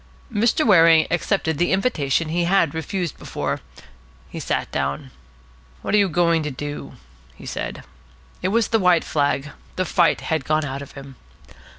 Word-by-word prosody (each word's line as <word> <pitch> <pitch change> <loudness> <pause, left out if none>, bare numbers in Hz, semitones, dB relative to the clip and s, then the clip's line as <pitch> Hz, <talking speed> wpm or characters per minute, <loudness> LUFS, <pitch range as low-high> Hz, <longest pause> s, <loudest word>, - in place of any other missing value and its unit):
Mr. 230 +8 +2
Waring 165 -6 +6
accepted 175 -3 0
the 175 - +2
invitation 165 - +1
he 170 +2 0
had 175 -4 +2
refused 165 0 -3
before. - - -3 0.7
He - - -6
sat - - -2
down. 70 +1 -3 0.7
"What - - -2
are 210 - +6
you 200 -2 +3
going 170 0 +2
to 150 - -3
do?" 145 +2 -6 0.4
he - - -13
said. - - -5 0.6
It 185 - 0
was 225 +2 +1
the 225 - +2
white 180 -3 +4
flag. 145 -1 -1 0.2
The 185 - 0
fight 175 -3 +2
had 160 -3 -1
gone 155 +2 0
out 135 0 -5
of 140 - -10
him. 135 -2 -11
165 Hz, 165 wpm, -22 LUFS, 145-185 Hz, 0.7 s, Waring